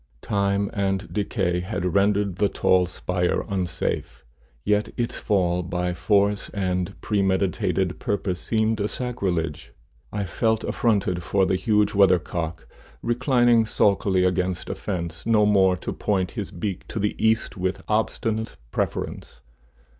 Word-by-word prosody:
Time 100 Hz, 0 st, 0 dB
and 95 Hz, -2 st, -1 dB
decay 90 Hz, -4 st, 0 dB
had 90 Hz, -1 st, -2 dB
rendered 100 Hz, -1 st, +2 dB
the 100 Hz, 0 st, +2 dB
tall 90 Hz, -1 st, +3 dB
spire 90 Hz, 0 st, -1 dB
unsafe, 90 Hz, -9 st, -3 dB, 0.4 s
yet 105 Hz, -, +1 dB
its 120 Hz, -1 st, -1 dB
fall 90 Hz, -4 st, +1 dB
by 90 Hz, 0 st, -2 dB
force 100 Hz, +3 st, +1 dB
and 90 Hz, -2 st, -2 dB
premeditated 95 Hz, -2 st, 0 dB
purpose 95 Hz, -3 st, -2 dB
seemed 110 Hz, -1 st, 0 dB
a 100 Hz, -, +1 dB
sacrilege. 95 Hz, -, -3 dB, 0.4 s
I 105 Hz, -, -2 dB
felt 110 Hz, +4 st, 0 dB
affronted 100 Hz, -6 st, +1 dB
for 95 Hz, +3 st, +2 dB
the 95 Hz, -, +1 dB
huge 105 Hz, +1 st, +2 dB
weathercock, 90 Hz, -4 st, +2 dB, 0.4 s
reclining 120 Hz, -1 st, +3 dB
sulkily 100 Hz, -3 st, +2 dB
against 90 Hz, 0 st, 0 dB
a -, -, -1 dB
fence, 85 Hz, -5 st, -4 dB
no 110 Hz, -2 st, +4 dB
more 95 Hz, -3 st, +4 dB
to -, -, -5 dB
point 95 Hz, -3 st, -1 dB
his 105 Hz, -5 st, -5 dB
beak 95 Hz, +2 st, -5 dB
to -, -, -6 dB
the 105 Hz, 0 st, 0 dB
east 110 Hz, +1 st, +2 dB
with 95 Hz, 0 st, -2 dB
obstinate 110 Hz, 0 st, -1 dB, 0.2 s
preference. -, -, -3 dB
100 Hz, 130 wpm, -24 LUFS, 90-105 Hz, 0.4 s, no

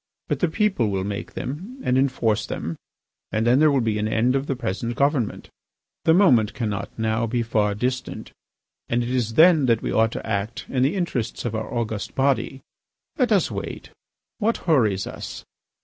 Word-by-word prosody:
But -, -, 0 dB
the 180 Hz, -, +2 dB
people 180 Hz, -, +1 dB
will 95 Hz, -1 st, -1 dB
make 100 Hz, 0 st, -5 dB
them, 190 Hz, -, -6 dB
and 125 Hz, -, +1 dB
enforce 130 Hz, -5 st, +1 dB
them, 85 Hz, -, -4 dB, 0.6 s
and 110 Hz, +1 st, 0 dB
then 125 Hz, +3 st, +4 dB
there 155 Hz, 0 st, +6 dB
will 140 Hz, -3 st, +2 dB
be 110 Hz, -2 st, 0 dB
an 105 Hz, -, 0 dB
end 120 Hz, +4 st, +2 dB
of 135 Hz, +1 st, -1 dB
the 135 Hz, -, -1 dB
present 120 Hz, 0 st, -3 dB
government. 140 Hz, -5 st, 0 dB, 0.5 s
The 160 Hz, -, +6 dB
moment 125 Hz, -, +4 dB
cannot 105 Hz, -4 st, -3 dB
now 110 Hz, +1 st, 0 dB
be 120 Hz, +1 st, 0 dB
far 105 Hz, -3 st, +1 dB
distant; 125 Hz, +4 st, -3 dB, 0.6 s
and 120 Hz, +1 st, +1 dB
it 120 Hz, -, -3 dB
is 115 Hz, -3 st, -1 dB
then 160 Hz, -3 st, +6 dB
that 115 Hz, -2 st, +2 dB
we -, -, -1 dB
ought 110 Hz, 0 st, +3 dB
to -, -, -6 dB
act 105 Hz, +1 st, -2 dB
in 130 Hz, -, 0 dB
the 140 Hz, +8 st, +2 dB
interests 130 Hz, -, -2 dB
of 115 Hz, -, -2 dB
our 110 Hz, 0 st, -4 dB
august 110 Hz, -4 st, -3 dB
body. 135 Hz, 0 st, 0 dB, 0.6 s
Let 250 Hz, -3 st, +2 dB
us 200 Hz, -4 st, +3 dB
wait. -, -, -6 dB, 0.5 s
What 225 Hz, +1 st, +1 dB
hurries 110 Hz, -, +2 dB
us? -, -, -7 dB
120 Hz, 185 wpm, -23 LUFS, 110-140 Hz, 0.6 s, there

